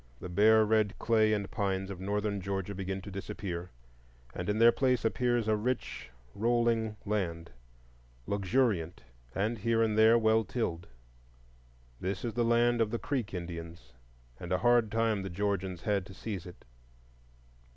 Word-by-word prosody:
The 90 Hz, -, -7 dB
bare 110 Hz, +4 st, +5 dB
red 110 Hz, -1 st, +1 dB
clay 110 Hz, -2 st, +3 dB
and 105 Hz, -2 st, -1 dB
pines 95 Hz, -1 st, -1 dB
of 95 Hz, -, -7 dB
Northern 100 Hz, +1 st, -2 dB
Georgia 95 Hz, +1 st, -3 dB
begin 95 Hz, 0 st, -4 dB
to 100 Hz, -, -8 dB
disappear, 90 Hz, -2 st, -5 dB, 0.6 s
and -, -, -4 dB
in 105 Hz, -, +1 dB
their 115 Hz, +1 st, +7 dB
place 125 Hz, -3 st, +1 dB
appears 120 Hz, -1 st, +1 dB
a 110 Hz, -, +3 dB
rich 115 Hz, -, -3 dB, 0.2 s
rolling 115 Hz, -1 st, +1 dB
land, 85 Hz, -6 st, -2 dB, 0.7 s
luxuriant, 100 Hz, -, 0 dB, 0.3 s
and 110 Hz, +3 st, -1 dB
here 115 Hz, +2 st, +2 dB
and 110 Hz, -1 st, +1 dB
there 110 Hz, +2 st, +6 dB
well 110 Hz, 0 st, +3 dB
tilled. 90 Hz, -6 st, -3 dB, 1.1 s
This 95 Hz, +2 st, -3 dB
is 115 Hz, -, -3 dB
the 120 Hz, -, +1 dB
land 120 Hz, 0 st, +3 dB
of 110 Hz, -, +2 dB
the 115 Hz, -, -2 dB
Creek 125 Hz, -4 st, -3 dB
Indians; 85 Hz, -6 st, -7 dB, 0.5 s
and 85 Hz, -, -7 dB
a 90 Hz, -, +3 dB
hard 120 Hz, +1 st, +3 dB
time 115 Hz, -2 st, +1 dB
the 95 Hz, -, -5 dB
Georgians 95 Hz, -2 st, -2 dB
had 100 Hz, -3 st, 0 dB
to 95 Hz, -, -12 dB
seize 95 Hz, -3 st, -5 dB
it. 90 Hz, -, -13 dB
105 Hz, 155 wpm, -31 LUFS, 95-115 Hz, 1.1 s, their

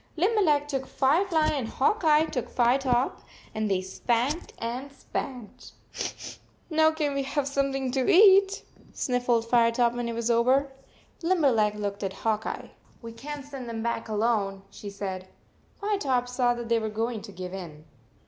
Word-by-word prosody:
Limberleg 335 Hz, -6 st, +2 dB
took 270 Hz, -2 st, -3 dB
Firefly 315 Hz, +3 st, +2 dB
and 270 Hz, -6 st, -2 dB
Hawk 320 Hz, -, +1 dB
Eye 310 Hz, 0 st, +5 dB
took 265 Hz, -6 st, -4 dB
Firetop, 250 Hz, +1 st, +1 dB, 0.3 s
and 215 Hz, -1 st, -1 dB
they 185 Hz, -1 st, 0 dB
spanked 240 Hz, -, -1 dB
and 250 Hz, +4 st, -5 dB
spanked. 250 Hz, -4 st, -7 dB, 0.4 s
" -, -, -13 dB
Now, 315 Hz, 0 st, +5 dB
can 310 Hz, -2 st, -1 dB
we 275 Hz, -, 0 dB
have 275 Hz, +1 st, -2 dB
something 275 Hz, -2 st, -1 dB
to 260 Hz, -1 st, 0 dB
eat?" 390 Hz, +1 st, +6 dB, 0.3 s
sniffled 245 Hz, -2 st, 0 dB
Firetop 235 Hz, 0 st, +3 dB
when 240 Hz, -1 st, -3 dB
it 230 Hz, -, -4 dB
was 235 Hz, 0 st, 0 dB
over. 260 Hz, +4 st, +3 dB, 0.5 s
Limber 330 Hz, -5 st, +3 dB
leg 210 Hz, -2 st, +2 dB
looked 205 Hz, -1 st, -4 dB
at 195 Hz, -2 st, -2 dB
Hawk 220 Hz, +2 st, -1 dB
Eye. -, -, -6 dB
" -, -, -30 dB
We 230 Hz, -, -7 dB
can 285 Hz, +5 st, -7 dB
t 285 Hz, -, -16 dB
send 260 Hz, -4 st, -7 dB
them 225 Hz, -1 st, -4 dB
back 235 Hz, -1 st, -2 dB
alone," 210 Hz, -3 st, 0 dB
she 205 Hz, -, -8 dB
said. 190 Hz, -2 st, -5 dB, 0.5 s
Firetop 290 Hz, -13 st, 0 dB
saw 245 Hz, -1 st, +1 dB
that 240 Hz, -1 st, -6 dB
they 230 Hz, 0 st, +2 dB
were 220 Hz, -1 st, -3 dB
going 225 Hz, +1 st, -2 dB
to 200 Hz, -, -10 dB
give 185 Hz, -1 st, -7 dB
in. 160 Hz, -5 st, -8 dB
245 Hz, 170 wpm, -27 LUFS, 225-285 Hz, 0.5 s, eat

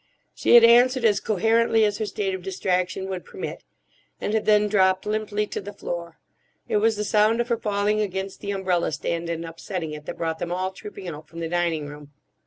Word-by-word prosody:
She -, -, +4 dB
had 235 Hz, -, +9 dB
answered 245 Hz, +2 st, +6 dB
as 205 Hz, -3 st, +4 dB
coherently 225 Hz, +2 st, +2 dB
as 205 Hz, -1 st, -1 dB
her 215 Hz, -, -1 dB
state 195 Hz, -1 st, -2 dB
of 190 Hz, -, -4 dB
distraction 185 Hz, 0 st, -1 dB
would 185 Hz, -2 st, -4 dB
permit, -, -, -7 dB, 0.6 s
and 210 Hz, -, -2 dB
had 220 Hz, -, 0 dB
then 210 Hz, 0 st, +5 dB
dropped 190 Hz, -2 st, +2 dB
limply 210 Hz, 0 st, -1 dB
to -, -, -5 dB
the 205 Hz, +1 st, -8 dB
floor. 170 Hz, -4 st, -6 dB, 0.5 s
It -, -, +1 dB
was 220 Hz, +1 st, +3 dB
the 210 Hz, -, -1 dB
sound 215 Hz, +2 st, +3 dB
of 240 Hz, +1 st, -1 dB
her 235 Hz, -, +2 dB
falling 210 Hz, -1 st, 0 dB
against 190 Hz, -1 st, -3 dB
the 200 Hz, -, -5 dB
umbrella 185 Hz, -4 st, 0 dB
stand 170 Hz, +2 st, -3 dB
and 165 Hz, 0 st, -3 dB
upsetting 165 Hz, 0 st, -5 dB
it 150 Hz, 0 st, -9 dB
that -, -, -5 dB
brought 160 Hz, -1 st, -2 dB
them 175 Hz, -, -4 dB
all 185 Hz, +1 st, -1 dB
trooping 195 Hz, 0 st, -9 dB
out 155 Hz, -2 st, -7 dB
from 165 Hz, -, -10 dB
the 165 Hz, -1 st, -3 dB
dining 170 Hz, -3 st, 0 dB
room. 145 Hz, 0 st, -11 dB
195 Hz, 210 wpm, -24 LUFS, 175-210 Hz, 0.6 s, had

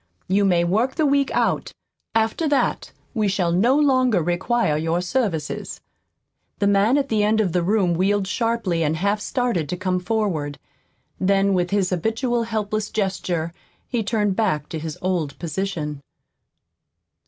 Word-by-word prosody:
You 200 Hz, +2 st, +2 dB
may 175 Hz, -3 st, +3 dB
work 220 Hz, +9 st, +1 dB
the 315 Hz, -, +2 dB
week 280 Hz, -1 st, +2 dB
out. -, -, 0 dB, 0.4 s
After 225 Hz, +8 st, +1 dB
that 285 Hz, -, 0 dB, 0.2 s
we 215 Hz, -4 st, +1 dB
shall 185 Hz, -3 st, +1 dB
no 225 Hz, +10 st, +3 dB
longer 255 Hz, -, +3 dB
require 175 Hz, +1 st, +1 dB
your 165 Hz, +3 st, 0 dB
services." 180 Hz, -, -2 dB, 0.8 s
The 200 Hz, -, 0 dB
man 200 Hz, +6 st, +4 dB
at 280 Hz, -1 st, 0 dB
the 215 Hz, -2 st, +2 dB
end 215 Hz, +1 st, +2 dB
of 200 Hz, -5 st, +1 dB
the 180 Hz, -, +1 dB
room 185 Hz, -1 st, +2 dB
wheeled 195 Hz, +3 st, +1 dB
sharply 225 Hz, -5 st, -1 dB
and 155 Hz, +1 st, +1 dB
half 200 Hz, +4 st, 0 dB
started 235 Hz, -, -1 dB
to 180 Hz, -, -2 dB
come 185 Hz, 0 st, 0 dB
forward. 180 Hz, -8 st, -1 dB, 0.6 s
Then, 195 Hz, +1 st, +2 dB
with 180 Hz, -1 st, +1 dB
his 200 Hz, -2 st, +1 dB
habitual 230 Hz, -, 0 dB
helpless 215 Hz, -1 st, -2 dB
gesture, 180 Hz, -5 st, -2 dB, 0.4 s
he 240 Hz, -2 st, 0 dB
turned 210 Hz, -2 st, 0 dB
back 185 Hz, -9 st, 0 dB
to 160 Hz, -, -4 dB
his 155 Hz, -1 st, -5 dB
old 175 Hz, -6 st, -1 dB
position. 160 Hz, -4 st, -3 dB
195 Hz, 155 wpm, -22 LUFS, 175-225 Hz, 0.8 s, man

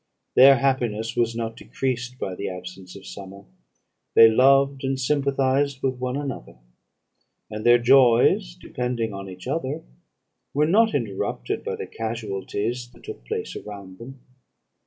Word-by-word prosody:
Their 135 Hz, +1 st, +8 dB
happiness 120 Hz, -4 st, -1 dB
was 115 Hz, -1 st, 0 dB
not 115 Hz, -1 st, -4 dB
decreased 125 Hz, 0 st, -4 dB
by 95 Hz, -, -4 dB
the 100 Hz, -, -4 dB
absence 90 Hz, 0 st, -9 dB
of 100 Hz, -, -12 dB
summer. 100 Hz, 0 st, -10 dB, 0.7 s
They 115 Hz, 0 st, +8 dB
loved, 135 Hz, +3 st, +4 dB
and 135 Hz, 0 st, -1 dB
sympathised 135 Hz, 0 st, 0 dB
with 130 Hz, -2 st, -1 dB
one 125 Hz, +1 st, -2 dB
another; 135 Hz, -, -6 dB, 1.0 s
and 105 Hz, 0 st, -5 dB
their 120 Hz, 0 st, +6 dB
joys, 120 Hz, -, +4 dB
depending 120 Hz, -3 st, -3 dB
on 100 Hz, 0 st, -7 dB
each 90 Hz, 0 st, -10 dB
other, -, -, -3 dB, 0.7 s
were 150 Hz, +1 st, +3 dB
not 220 Hz, +7 st, +3 dB
interrupted 100 Hz, -, -3 dB
by -, -, -3 dB
the -, -, -6 dB
casualties 115 Hz, +1 st, -4 dB
that -, -, -19 dB
took -, -, -9 dB
place -, -, -4 dB
around 100 Hz, -3 st, -9 dB
them. 130 Hz, +2 st, -11 dB
120 Hz, 140 wpm, -24 LUFS, 100-135 Hz, 1.0 s, Their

